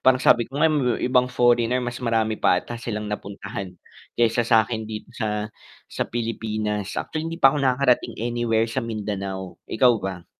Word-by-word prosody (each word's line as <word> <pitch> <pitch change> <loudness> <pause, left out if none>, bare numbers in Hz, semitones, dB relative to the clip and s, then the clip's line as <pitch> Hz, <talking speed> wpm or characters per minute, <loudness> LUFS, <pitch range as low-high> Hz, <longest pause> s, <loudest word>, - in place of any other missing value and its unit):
parang 130 0 +5
sabi 120 - +5
ko 140 +5 -6
nga 160 - +6
may 130 -6 +1
ibang 125 0 +3
foreigner 120 +1 +3
mas 125 0 -4
marami 110 -2 +1
pa 90 -3 +3
ata 120 - -7
silang 110 -3 -4
napuntahan 100 -2 -6 0.4
kaysa 120 0 +2
sakin 110 0 +2
dito 110 0 -7
sa 105 -2 -2 0.4
sa - - -2
Pilipinas, 110 -3 -3
actually 155 0 -3
hindi 165 +1 -7
pa 135 0 +7
ako 150 - -1
nakakarating 130 -1 +2
anywhere 115 -1 0
sa 130 +3 -2
Mindanao, 100 -4 -4
ikaw 120 +1 +4
ba? 95 -3 -5
115 Hz, 165 wpm, -23 LUFS, 105-125 Hz, 0.4 s, pa